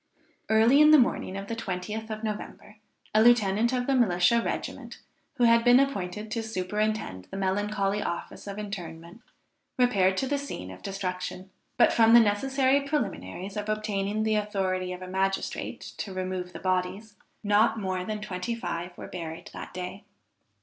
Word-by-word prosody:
Early 225 Hz, +6 st, +5 dB
in 305 Hz, -, +8 dB
the 310 Hz, -, +9 dB
morning 235 Hz, -6 st, +1 dB
of 195 Hz, -, -5 dB
the 230 Hz, -, -4 dB
20th 215 Hz, +2 st, -4 dB
of 215 Hz, 0 st, -5 dB
November, 215 Hz, 0 st, -6 dB, 0.4 s
a 215 Hz, -, +5 dB
lieutenant 225 Hz, -1 st, +4 dB
of 250 Hz, -1 st, 0 dB
the 275 Hz, -, +1 dB
militia 230 Hz, -2 st, +3 dB
regiment -, -, -5 dB, 0.4 s
who 245 Hz, -, 0 dB
had 230 Hz, 0 st, +5 dB
been 245 Hz, +1 st, +7 dB
appointed 215 Hz, -6 st, -2 dB
to 230 Hz, -, -1 dB
superintend 210 Hz, -, -2 dB
the 195 Hz, -, -6 dB
melancholy 200 Hz, +1 st, 0 dB
office 170 Hz, +3 st, -5 dB
of 200 Hz, 0 st, -6 dB
interment, 175 Hz, -2 st, -7 dB, 0.6 s
repaired 195 Hz, -7 st, +3 dB
to 265 Hz, -, +1 dB
the 285 Hz, +1 st, 0 dB
scene 180 Hz, -, -6 dB
of 95 Hz, -, -11 dB
destruction. 185 Hz, -1 st, -5 dB, 0.3 s
But -, -, +5 dB
from 225 Hz, 0 st, +6 dB
the -, -, +10 dB
necessary 265 Hz, +6 st, +2 dB
preliminaries 195 Hz, -, -3 dB
of 210 Hz, 0 st, -4 dB
obtaining 215 Hz, 0 st, -1 dB
the 220 Hz, -1 st, +2 dB
authority 190 Hz, -3 st, -1 dB
of 180 Hz, 0 st, -6 dB
a -, -, -7 dB
magistrate 195 Hz, +1 st, -2 dB, 0.2 s
to 200 Hz, -, -4 dB
remove 185 Hz, -1 st, -3 dB
the -, -, -7 dB
bodies, 185 Hz, +3 st, -2 dB, 0.3 s
not 215 Hz, +2 st, +3 dB
more 185 Hz, -2 st, -2 dB
than 215 Hz, +2 st, -4 dB
twenty 210 Hz, +2 st, -3 dB
five 175 Hz, -5 st, -5 dB
were -, -, -8 dB
buried 165 Hz, -2 st, -7 dB
that -, -, -8 dB
day. 185 Hz, +2 st, -7 dB
205 Hz, 165 wpm, -27 LUFS, 185-225 Hz, 0.6 s, the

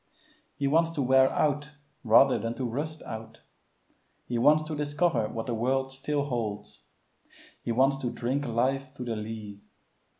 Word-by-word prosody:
He 140 Hz, -, -2 dB
wants 165 Hz, +4 st, +3 dB
to 150 Hz, -, -1 dB
wear 130 Hz, +1 st, +5 dB
out 150 Hz, 0 st, 0 dB, 0.3 s
rather 125 Hz, +3 st, +5 dB
than 115 Hz, 0 st, -3 dB
to 130 Hz, -, -3 dB
rust 150 Hz, +6 st, -4 dB
out. 110 Hz, 0 st, -8 dB, 0.8 s
He 120 Hz, -1 st, -2 dB
wants 155 Hz, +5 st, +5 dB
to 155 Hz, 0 st, -5 dB
discover 145 Hz, -5 st, 0 dB
what 115 Hz, -1 st, -4 dB
the 120 Hz, -, -2 dB
world 130 Hz, +4 st, 0 dB
still 140 Hz, +2 st, -2 dB
holds. 110 Hz, -6 st, -4 dB, 0.8 s
He -, -, -3 dB
wants 135 Hz, +4 st, +3 dB
to 130 Hz, -3 st, -2 dB
drink 125 Hz, +4 st, -2 dB
life 130 Hz, +3 st, -1 dB
to 125 Hz, -, -6 dB
the 120 Hz, -2 st, -3 dB
lees. 105 Hz, -2 st, -7 dB
130 Hz, 160 wpm, -28 LUFS, 115-145 Hz, 0.8 s, wear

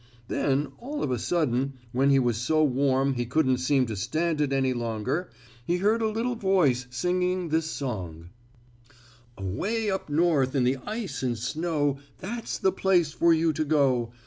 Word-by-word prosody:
Then, 140 Hz, +1 st, 0 dB
all 290 Hz, +5 st, -4 dB
of 130 Hz, -, -1 dB
a 125 Hz, -, 0 dB
sudden, 135 Hz, -3 st, 0 dB, 0.2 s
when 135 Hz, +3 st, +2 dB
he 135 Hz, -, +5 dB
was 120 Hz, -3 st, +2 dB
so 155 Hz, +8 st, +1 dB
warm 135 Hz, 0 st, +2 dB
he 120 Hz, -2 st, -3 dB
couldn't 130 Hz, -1 st, +2 dB
seem 130 Hz, 0 st, +2 dB
to 110 Hz, -2 st, -4 dB
stand 155 Hz, -, -1 dB
it 145 Hz, -2 st, +1 dB
any 135 Hz, -1 st, +1 dB
longer 120 Hz, -, -2 dB, 0.3 s
he 175 Hz, +8 st, 0 dB
heard 215 Hz, +5 st, +2 dB
a 220 Hz, -, +1 dB
little 230 Hz, +3 st, -1 dB
voice 180 Hz, -, +2 dB
singing 180 Hz, +5 st, -1 dB
this 160 Hz, +1 st, +1 dB
song: 90 Hz, -, -5 dB, 1.1 s
"Away 200 Hz, -, -2 dB
up 190 Hz, -4 st, -3 dB
North 145 Hz, -4 st, +2 dB
in 130 Hz, -, +3 dB
the 130 Hz, +2 st, +2 dB
ice 215 Hz, -2 st, -4 dB
and 125 Hz, -3 st, -1 dB
snow, 150 Hz, -2 st, -1 dB, 0.2 s
That's 230 Hz, +4 st, -5 dB
the 190 Hz, -, +2 dB
place 180 Hz, -4 st, +2 dB
for 170 Hz, +1 st, +3 dB
you 160 Hz, 0 st, +3 dB
to 155 Hz, -, -1 dB
go. 135 Hz, -6 st, +2 dB
145 Hz, 170 wpm, -26 LUFS, 125-175 Hz, 1.1 s, he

